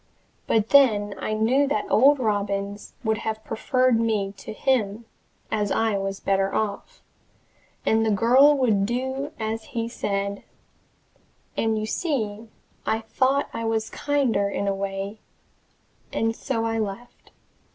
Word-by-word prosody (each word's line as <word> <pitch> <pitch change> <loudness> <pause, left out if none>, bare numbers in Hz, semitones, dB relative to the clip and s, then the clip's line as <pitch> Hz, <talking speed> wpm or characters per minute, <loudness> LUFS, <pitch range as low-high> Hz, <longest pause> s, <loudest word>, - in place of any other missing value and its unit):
But 220 -1 +2
then 215 -8 +5
I 215 - -2
knew 245 +6 +2
that 215 -7 0
old 280 +5 +6
Robins 205 -3 -2
would 220 -2 0
have 220 0 -4
preferred 255 +1 +1
me 215 -4 0
to - - -8
him, 225 -3 0 0.5
as 210 -2 0
I 225 -2 +1
was 195 0 -3
better 195 0 0
off 220 - -3 0.8
and 220 0 +3
the 220 - +1
girl 255 +8 +5
would 215 -7 +2
do 260 +4 -2
as 220 0 -3
he 230 0 0
said 200 -3 -2 1.1
and, 220 -1 +1
you 215 - -2
see, 220 -5 -2 0.4
I 220 0 0
thought 265 +5 +1
I 230 - -4
was 225 -1 -1
kinder 265 -9 +1
in 200 - -2
the 200 - +1
way 195 +2 -4 0.9
and 225 0 0
so 230 -4 -2
I 225 0 -1
left. 215 +3 -6
220 Hz, 140 wpm, -24 LUFS, 205-245 Hz, 1.1 s, old